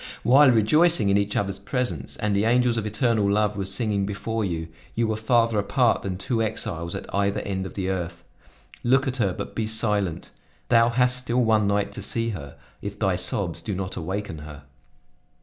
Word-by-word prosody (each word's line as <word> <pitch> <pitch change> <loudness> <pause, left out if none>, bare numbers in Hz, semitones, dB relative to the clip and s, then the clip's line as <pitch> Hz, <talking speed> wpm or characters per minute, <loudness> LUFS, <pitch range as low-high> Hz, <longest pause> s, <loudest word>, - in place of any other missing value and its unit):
While 135 +3 +6
rejoicing 125 +2 +4
in 100 - +4
each 100 +1 -2
other's 100 -1 -1
presence, 110 - -3
and 105 -1 -1
the 100 +2 +2
angels 120 0 +3
of 110 -2 -2
eternal 105 -1 +1
love 105 0 +1
were 100 -1 -3
singing 100 +1 0
before 110 +2 -3
you, 85 -4 -3 0.3
you 115 - +1
were 110 - 0
farther 115 0 +2
apart 110 +4 +2
than 95 -2 -4
two 115 +3 -1
exiles 85 -6 -2
at - - -7
either 100 0 +1
end 95 -1 -3
of - - -12
the 95 -1 -1
earth. 85 -2 -4 0.6
Look 130 +3 +3
at 130 0 -1
her, 100 -6 +1
but - - -6
be 110 -1 -2
silent. 105 -6 -1 0.4
Thou 115 -1 +5
hast 125 +1 +3
still 125 0 0
one 110 -2 +3
night 100 0 0
to 100 - -6
see 115 +3 0
her, 70 -10 -7 0.2
if 100 0 -6
thy 95 -4 +1
sobs 90 -1 -1
do 100 - -4
not 95 0 -4
awaken 90 -1 -4
her." 75 -2 -10
105 Hz, 195 wpm, -24 LUFS, 95-115 Hz, 0.6 s, While